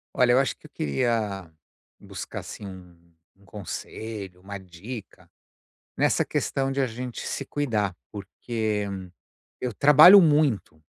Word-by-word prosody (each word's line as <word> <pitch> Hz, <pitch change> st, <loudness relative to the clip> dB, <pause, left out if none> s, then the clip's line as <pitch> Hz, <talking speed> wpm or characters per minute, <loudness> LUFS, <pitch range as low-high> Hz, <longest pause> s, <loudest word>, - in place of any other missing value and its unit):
Olha, 120 Hz, -1 st, +4 dB
eu -, -, +5 dB
acho 135 Hz, -, 0 dB
que -, -, -16 dB
eu -, -, -30 dB
queria 100 Hz, -, -2 dB, 0.5 s
buscar, -, -, -7 dB
assim, 105 Hz, -, -9 dB
um 90 Hz, -3 st, -13 dB, 0.3 s
um 100 Hz, +1 st, -25 dB
conselho, 100 Hz, -1 st, -7 dB
uma 100 Hz, +1 st, -7 dB
dica 95 Hz, +5 st, -10 dB, 0.7 s
nessa -, -, +2 dB
questão 135 Hz, 0 st, -1 dB
de 135 Hz, +1 st, 0 dB
a 130 Hz, -, +1 dB
gente 125 Hz, +1 st, -6 dB
se 140 Hz, -, -4 dB
cuidar, 110 Hz, -10 st, -1 dB, 0.2 s
porque 105 Hz, +1 st, -3 dB, 0.7 s
eu 125 Hz, -2 st, -3 dB
trabalho 150 Hz, -, +9 dB
muito, 145 Hz, -, +2 dB
110 Hz, 130 wpm, -25 LUFS, 95-130 Hz, 0.7 s, trabalho